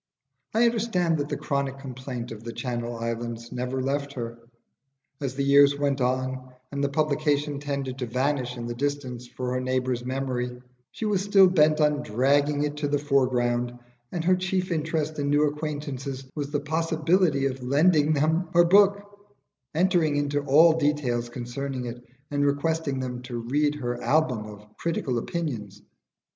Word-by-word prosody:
I 230 +2 +5
understand 205 -9 +1
that 145 0 -2
the - - -2
chronic 140 -2 -2
complaint 130 -2 -6
of 110 0 -8
'The 115 0 -6
Channel 120 -2 -3
Islands' 115 0 -4
never 125 +1 -2
left 140 +1 -2
her. 115 -2 -6 0.8
As 135 -2 -3
the 140 - -1
years 140 0 +6
went 140 -2 0
on 130 0 -2 0.2
and 140 0 -2
the 140 - +2
publication 145 0 0
tended 140 -2 -4
to 125 - -2
vanish 130 0 -1
in 120 - -5
the 120 - -3
distance 130 -2 -3
for 125 0 -4
her 130 - -1
neighbours' 130 -1 -1
memory, 125 -1 -3 0.3
she 225 - -5
was 205 -3 +1
still 195 -1 +6
bent 155 -4 +4
on 150 -1 +3
dragging 145 +6 +2
it 150 0 -2
to 150 -1 -1
the 145 0 +1
foreground, 125 -4 +1 0.3
and 170 - -2
her 185 +2 +4
chief 185 0 -1
interest 155 -1 -1
in 145 0 0
new 145 +1 +4
acquaintances 145 -3 -4
was 145 -2 -4
the 145 0 0
possibility 160 0 +1
of 135 -1 -2
lending 150 +4 +3
them 160 +4 +1
her 175 - +8
book, 200 +2 +5 0.7
entering 170 -3 +3
into 145 0 0
all 155 +4 +6
details 135 -6 0
concerning 125 +2 -4
it, 120 0 -7 0.3
and 145 0 +1
requesting 145 0 0
them 125 -1 -4
to 125 -1 -6
read 145 +6 0
her 120 -4 -3
album 125 -5 +1
of 105 0 -11
"critical 140 -7 -1
opinions." 110 - -4
140 Hz, 165 wpm, -26 LUFS, 125-150 Hz, 0.8 s, her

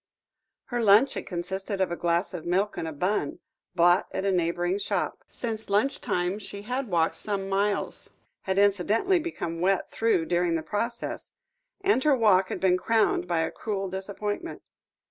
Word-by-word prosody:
Her 240 - +1
lunch 220 +5 +6
had - - -5
consisted 190 +3 -3
of 190 -2 +1
a - - -1
glass 170 +3 0
of 170 -3 -5
milk 190 +4 0
and 165 - -3
a - - -3
bun, 170 0 -1 0.4
bought 175 +1 +4
at 190 - -3
a 195 - +2
neighbouring 175 +1 0
shop; 200 - -2
since 220 -2 -5
lunch 210 +8 +1
time 180 +3 -1
she 200 0 -8
had 250 +4 -3
walked 170 -4 +1
some 200 -2 -3
miles, 200 +1 -1 0.3
had 190 0 -2
incidentally 205 - +3
become 170 - -4
wet 190 +1 +1
through 225 -7 +1
during 175 0 +1
the 160 - -2
process, 235 +6 -4 0.5
and 390 -9 +2
her 295 -2 +4
walk 200 -6 +4
had - - -3
been 185 -1 +3
crowned 220 0 +1
by 170 -2 +1
a 160 - -1
cruel 195 -3 -3
disappointment. 205 - -4
195 Hz, 170 wpm, -27 LUFS, 175-215 Hz, 0.5 s, lunch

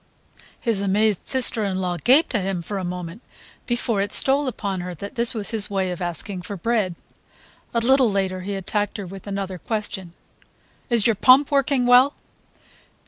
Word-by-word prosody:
His 225 -5 0
amazed 205 0 0
sister 250 -4 +4
in 195 -2 -2
law 180 -2 -2
gaped 270 +3 +4
at 210 -5 0
him 185 -2 -3
for 200 +3 -5
a - - -5
moment 180 +3 -6 0.5
before 240 -4 -1
it 200 - -2
stole 275 +1 +5
upon 200 -6 -4
her 180 0 -6
that 200 +5 -8
this 235 0 0
was 210 -1 0
his 220 -3 -1
way 190 -2 -1
of 180 - -6
asking 180 +2 -4
for 195 +3 -7
bread. 210 -3 -1 0.8
A 235 - 0
little 260 0 +4
later 190 -2 -2
he 200 +2 -5
attacked 205 +2 -2
her 200 - -6
with 195 +2 -11
another 195 -2 -4
question: 195 -3 -4 0.8
"Is 235 -4 +2
your 230 - +4
pump 265 +7 +5
working 275 -2 +1
well?" 250 +4 +5
205 Hz, 180 wpm, -22 LUFS, 185-235 Hz, 0.8 s, stole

